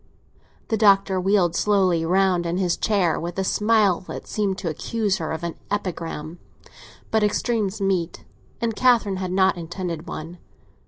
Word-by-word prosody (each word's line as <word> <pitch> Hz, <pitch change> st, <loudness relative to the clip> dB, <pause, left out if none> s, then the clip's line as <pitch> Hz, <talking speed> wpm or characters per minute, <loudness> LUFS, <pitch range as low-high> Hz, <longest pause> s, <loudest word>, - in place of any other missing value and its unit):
The 220 Hz, -, +1 dB
Doctor 195 Hz, -3 st, +4 dB
wheeled 185 Hz, -3 st, +2 dB
slowly 185 Hz, -5 st, +2 dB
round 180 Hz, 0 st, +2 dB
in 170 Hz, +1 st, -1 dB
his 180 Hz, -2 st, +1 dB
chair, 195 Hz, -7 st, +1 dB
with 170 Hz, +2 st, -5 dB
a 190 Hz, -, 0 dB
smile 210 Hz, -2 st, +2 dB
that -, -, -7 dB
seemed 200 Hz, -3 st, -1 dB
to -, -, -5 dB
accuse 205 Hz, +5 st, -1 dB
her 160 Hz, -4 st, -4 dB
of 160 Hz, +1 st, -4 dB
an 170 Hz, -1 st, -3 dB, 0.2 s
epigram; 170 Hz, -4 st, -4 dB, 0.7 s
but 220 Hz, -1 st, +2 dB
extremes 210 Hz, -1 st, 0 dB
meet, 190 Hz, -4 st, -1 dB, 0.3 s
and 230 Hz, -2 st, -1 dB
Catherine 230 Hz, -6 st, +3 dB
had 185 Hz, -1 st, -3 dB
not 190 Hz, 0 st, +3 dB
intended 170 Hz, -1 st, -5 dB
one. 165 Hz, +3 st, -7 dB
190 Hz, 155 wpm, -23 LUFS, 170-205 Hz, 0.7 s, Doctor